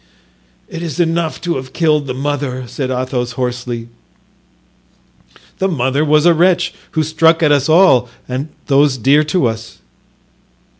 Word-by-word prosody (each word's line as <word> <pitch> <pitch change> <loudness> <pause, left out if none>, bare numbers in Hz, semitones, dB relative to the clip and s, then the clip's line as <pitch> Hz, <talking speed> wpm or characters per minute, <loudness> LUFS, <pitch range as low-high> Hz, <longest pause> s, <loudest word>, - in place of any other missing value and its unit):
"It 165 - -7
is 165 -3 -5
enough 165 -1 0
to 175 -4 -2
have 130 0 -8
killed 150 -4 +1
the 130 - -4
mother," 135 -2 -3
said 130 +2 -4
Athos, 125 -1 -2
hoarsely. 125 -2 -4 1.7
"The 190 - +1
mother 140 -4 0
was 150 +1 +3
a 175 - +6
wretch, 175 +1 +2 0.2
who 155 - +1
struck 160 +2 +2
at 150 - +4
us 140 0 +2
all 155 -8 +5 0.2
and 130 +2 -3
at - - -31
those 140 -1 +3
dear 140 +6 +3
to 155 -1 0
us." 115 -1 -4
145 Hz, 150 wpm, -16 LUFS, 130-165 Hz, 1.7 s, a